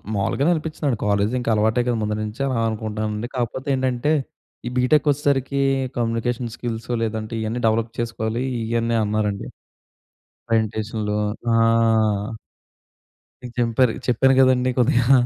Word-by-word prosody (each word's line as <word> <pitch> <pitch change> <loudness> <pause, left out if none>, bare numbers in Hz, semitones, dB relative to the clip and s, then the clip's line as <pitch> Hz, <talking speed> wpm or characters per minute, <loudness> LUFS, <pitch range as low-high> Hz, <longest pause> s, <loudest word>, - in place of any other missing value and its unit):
మావులుగా‌నే 135 - +1
అనిపిచ్చిదండి. 150 -5 -2
College 100 +2 +1
ఇంకా 120 -2 -1
అలవాటే 110 +3 +2
కదా! 120 -1 +1
ముందునుంచే 105 +4 -3
అలా 130 - -1
అనుకుంటానండి. 110 +1 -3
కాకపోతే 130 +3 -3
ఏంటంటే 130 +3 0 0.5
ఈ - - -1
బీటెక్ 145 +4 +3
వచ్చేసరికి 140 -1 0 0.4
కమ్యూనికేషన్ 115 0 -1
స్కిల్స్ 115 -1 -5
లేదంటే 110 0 -3
ఇయన్నీ 110 +3 -2
డెవలప్ 110 +1 +1
చేసుకోవాలి, 115 0 -2 0.2
ఇయన్నీ 115 0 0
అన్నారండి. 105 -1 -1 1.0
ప్రెజెంటేషన్‌లూ 110 -1 -1 0.4
ఆ! - - +4 1.8
ఇంక 125 - -7
జెంపారు. 120 0 +2
చెప్పాను 130 +2 +4
కదండీ 130 -1 +3
కొద్దిగా, 125 +2 +4
115 Hz, 115 wpm, -22 LUFS, 110-125 Hz, 1.8 s, ఆ